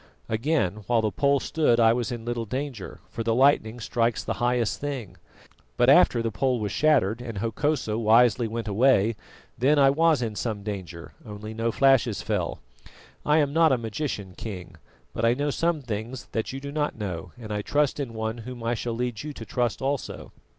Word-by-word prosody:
Again, 110 - 0
while 120 -2 +3
the 110 - +1
pole 140 -1 +2
stood 140 -5 +1
I 115 -1 +6
was 120 +1 -2
in 115 -2 -6
little 120 -1 -3
danger, 130 -4 -5
for - - -4
the 115 0 +1
lightning 125 -3 +3
strikes 115 0 0
the - - -2
highest 120 -2 +1
thing; 135 -8 -5 0.6
but - - +5
after 115 - +5
the 115 - -1
pole 125 +5 0
was 105 -2 -2
shattered 120 -8 +2
and 115 -4 -6
Hokosa 115 +1 -1
wisely 115 +1 +4
went 115 0 -4
away, 115 0 +3 0.4
then 140 +5 +4
I 135 -1 +6
was 160 -2 +3
in 110 -2 -3
some 105 -2 -3
danger, 90 -5 -7
only 105 +1 -8
no 115 +1 -1
flashes 130 -4 +3
fell. - - -2 0.7
I 150 +1 +4
am 145 -2 +2
not 165 -1 +5
a 130 - +3
magician, 110 -4 -4
King, 95 -6 -7 0.4
but 110 - -4
I 115 +1 +4
know 145 +2 -1
some 165 -1 0
things 115 +2 -5
that 110 - -2
you 135 - -5
do 140 +1 -7
not 150 -3 -2
know, 90 -5 -5
and 110 -3 -6
I 105 - -1
trust 145 +6 0
in 125 -5 -4
One 110 +1 -3
whom 120 +1 -8
I 115 +1 0
shall 120 0 -3
lead 120 -1 -3
you 150 0 -6
to 115 - -9
trust 120 0 -1
also." 140 -1 -3
120 Hz, 195 wpm, -26 LUFS, 110-135 Hz, 0.7 s, I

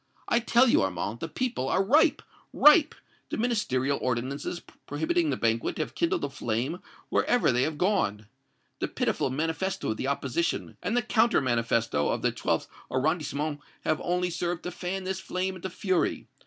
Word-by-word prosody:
I 235 - +3
tell 240 +2 +4
you, - - +4
Armand, 95 +4 -2
the 165 - -3
people 230 - -2
are 190 - +2
ripe 295 - +4 0.3
ripe! 300 +1 +6 0.3
The - - -3
Ministerial 140 - 0
ordinances 130 +7 -2 0.3
prohibiting 325 - 0
the - - 0
banquet 115 0 0
have 155 - -3
kindled 170 - 0
a 145 - -1
flame 130 +7 -2 0.3
wherever 245 - +3
they 125 +1 +2
have 155 +2 -1
gone. 180 - +1 0.5
The - - -1
pitiful - - -1
manifesto 160 - -1
of 110 - -3
the 130 - -2
opposition 140 +3 -1
and 205 +7 -1
the 245 - +2
counter 225 +2 +3
manifesto 115 - +1
of - - -1
the - - +3
Twelfth - - -1 0.2
Arrondissement 150 +1 -1 0.2
have 155 - 0
only 180 0 0
served 175 0 -2
to 180 - -4
fan 185 +2 -4
this 190 0 -3
flame 190 0 -3
into 185 +1 -5
fury. 185 -1 0
165 Hz, 170 wpm, -28 LUFS, 130-195 Hz, 0.5 s, ripe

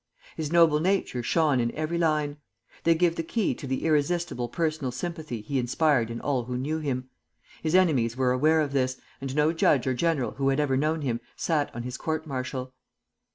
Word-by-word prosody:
His 155 -1 -3
noble 165 -3 +5
nature 180 -7 0
shone 150 +1 +2
in 120 -1 +1
every 155 +2 -2
line. 150 -3 +1 0.5
They 165 0 +5
give 170 0 +2
the - - 0
key 205 +6 0
to 140 - -8
the 130 +3 -2
irresistible 155 -4 0
personal 155 -3 -1
sympathy 155 -3 -5
he 135 +6 -2
inspired 125 -1 +2
in 115 0 -5
all 130 -4 -1
who 125 0 -3
knew 150 +5 -2
him. 130 -4 -3 0.5
His 160 +2 0
enemies 130 -11 +3
were 130 -1 +2
aware 155 +5 +3
of 145 -2 -2
this, 130 -1 0 0.2
and 135 0 -4
no 150 +2 +3
judge 150 -5 +3
or 130 - +1
general 145 -1 0
who 135 0 0
had 135 +1 +1
ever 145 -3 +2
known 155 +3 0
him 120 -4 -1 0.2
sat 155 -4 0
on 120 - -4
his 125 +1 -5
court 160 0 -2
martial. 130 -2 -4
145 Hz, 200 wpm, -27 LUFS, 130-160 Hz, 0.5 s, noble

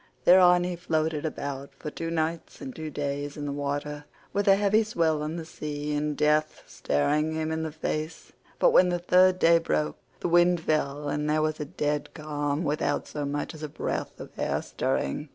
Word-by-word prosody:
Thereon 180 -1 +7
he 180 0 -2
floated 160 -2 -1
about 140 -2 -6
for 150 +2 -7
two 165 +2 -4
nights 165 0 -2
and 265 -2 -7
two 160 -1 -5
days 145 0 -3
in 145 - -4
the 145 - -2
water, 145 +1 -3 0.3
with 205 +1 0
a 195 - +7
heavy 205 +2 +3
swell 165 -7 0
on 155 +2 -3
the 165 -2 -5
sea 150 -1 -4
and 150 0 -1
death 150 +1 +1
staring 150 - 0
him 160 0 -2
in 160 0 -1
the 160 -1 -3
face; 155 +1 -4 0.3
but - - +4
when 180 - +6
the 175 - +1
third 180 +1 +4
day 170 -1 +5
broke, 75 - -1 0.2
the - - -2
wind 175 +1 +4
fell 150 -2 -1
and 150 +1 -1
there 155 0 +2
was 155 0 -1
a 150 - -3
dead 150 -2 -2
calm 145 0 -2
without 145 -1 -1
so 150 -1 -4
much 145 +1 -3
as 155 - -11
a 155 - -4
breath - - -4
of - - -9
air - - -1
stirring. 70 - -2
155 Hz, 200 wpm, -27 LUFS, 145-170 Hz, 0.3 s, Thereon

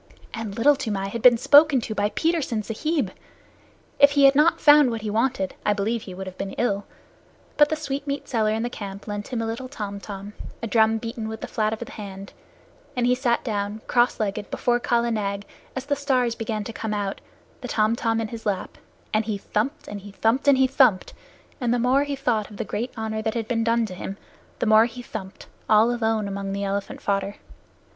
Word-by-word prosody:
And 220 -2 -5
Little 285 +5 +5
Toomai 205 -8 -3
had 230 +3 -5
been 245 0 +7
spoken 290 +2 +6
to 220 - -4
by 205 0 0
Petersen 305 -7 0
Sahib! 250 - -1 0.9
If 285 0 +7
he 285 -1 +4
had 275 0 +8
not 300 +4 +4
found 295 -3 +7
what 225 -2 -4
he 210 - -2
wanted, 225 -3 0
I 210 - +3
believe 215 +3 -1
he 185 -4 -9
would 190 +1 -6
have 185 -1 -9
been 195 0 -4
ill. 205 -4 -1 0.7
But 295 -1 +5
the 315 - 0
sweetmeat 280 -2 -4
seller 220 -3 +1
in 220 +1 0
the 240 - -1
camp 200 -2 -7
lent 205 0 -4
him 235 -3 -2
a - - -2
little 230 +3 -4
tom 205 -6 -5
tom 200 0 -8 0.3
a - - +1
drum 225 0 +3
beaten 230 0 -5
with 220 0 -6
the - - -4
flat 215 -1 0
of 220 - -2
the - - -8
hand 195 -2 -8 0.6
and 245 -1 +1
he 250 - +4
sat 250 -2 +1
down, 210 -2 -3
cross 240 0 +2
legged, 205 -1 -2
before 240 0 +1
Kala 235 0 +1
Nag 200 -2 -2 0.3
as 260 0 -4
the 285 0 0
stars 260 -4 +1
began 220 -2 -3
to 225 - -7
come 220 -1 -3
out, 200 -1 -3 0.4
the 250 - -5
tom 220 -1 +2
tom 225 -1 0
in 225 -1 -2
his 230 0 -7
lap, 195 -3 -3 0.3
and 215 0 +2
he 215 -2 -2
thumped 230 +9 -2
and 205 -1 -6
he 205 +1 -11
thumped 230 +7 +1
and 280 -2 +6
he 265 - +5
thumped, 255 -7 +3 0.5
and 245 -3 0
the 245 - +2
more 255 +4 +3
he 285 -1 -3
thought 240 -6 0
of 210 - -11
the - - -3
great 240 +4 -3
honor 220 0 -3
that 220 +1 -2
had 225 -2 -2
been 230 -1 0
done 230 0 +2
to 195 - -7
him, 190 +2 -6 0.4
the - - -1
more 220 0 +6
he 245 +1 -7
thumped, 190 -4 -8 0.2
all 220 +3 +5
alone 220 -3 0
among 195 0 -4
the 200 0 -2
elephant 200 0 -3
fodder. 200 0 -1
225 Hz, 220 wpm, -24 LUFS, 205-250 Hz, 0.9 s, had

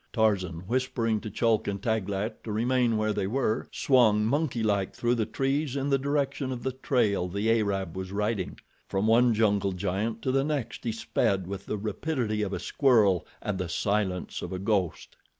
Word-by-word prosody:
Tarzan, 95 -7 +1
whispering 115 +1 0
to 110 - -5
Chulk 110 +1 +1
and 100 -1 -2
Taglat 105 0 -2
to 110 - -4
remain 120 +1 +2
where 110 0 +1
they 100 -2 -1
were, 120 0 0
swung, 110 -6 +4
monkey 130 -1 0
like, 100 -3 0
through 120 0 +1
the 115 -3 0
trees 140 +1 -1
in 140 0 -1
the 135 - +3
direction 140 -1 -1
of 125 -2 -5
the 130 - 0
trail 120 -8 +1
the 100 +5 0
Arab 95 -5 -2
was 95 0 -5
riding. 105 -1 -2 0.3
From 95 +1 -1
one 115 +1 +4
jungle 100 -3 +2
giant 105 +5 -2
to 130 - +1
the 135 +1 +2
next 145 -6 -3
he 115 - +1
sped 100 -3 0
with 100 +1 -6
the 105 - -2
rapidity 110 +1 -2
of 100 -2 -1
a - - -2
squirrel 110 - +3 0.2
and 100 -3 -2
the 90 -2 -3
silence 95 0 -1
of - - -5
a 95 - -3
ghost. 95 -3 -1
110 Hz, 185 wpm, -28 LUFS, 100-125 Hz, 0.3 s, swung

